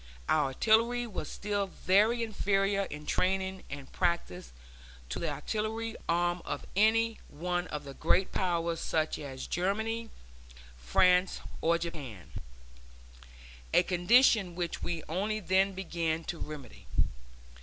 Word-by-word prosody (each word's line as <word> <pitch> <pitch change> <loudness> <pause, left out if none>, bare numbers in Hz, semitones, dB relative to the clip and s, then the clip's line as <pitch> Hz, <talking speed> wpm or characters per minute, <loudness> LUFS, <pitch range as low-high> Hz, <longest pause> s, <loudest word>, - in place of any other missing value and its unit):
Our - - +3
artillery 230 - +3
was 190 -9 -5
still 205 -1 -2
very 210 +6 +3
inferior 200 -2 +1
in 150 -3 -8
training 190 +3 0
and 140 -1 -8
practice 130 - -1 0.6
to - - -3
the 165 - -1
artillery 220 +9 -3
arm 175 +1 +1
of 145 - -4
any 225 +2 +3
one 175 +3 -2
of 150 -1 -5
the 140 -1 -8
great 180 +6 +2
Powers 170 -2 0
such 155 -1 0
as 135 -3 -6
Germany, 220 +5 -1 0.7
France, 180 - +3 0.2
or 170 +1 +3
Japan 145 - -7 1.4
a - - +7
condition 190 +1 +4
which 175 -1 -3
we 170 -3 -3
only 205 +6 -1
then 190 0 +2
began 165 -3 -2
to 165 0 -5
remedy. 145 -6 -8
180 Hz, 125 wpm, -31 LUFS, 160-205 Hz, 1.4 s, a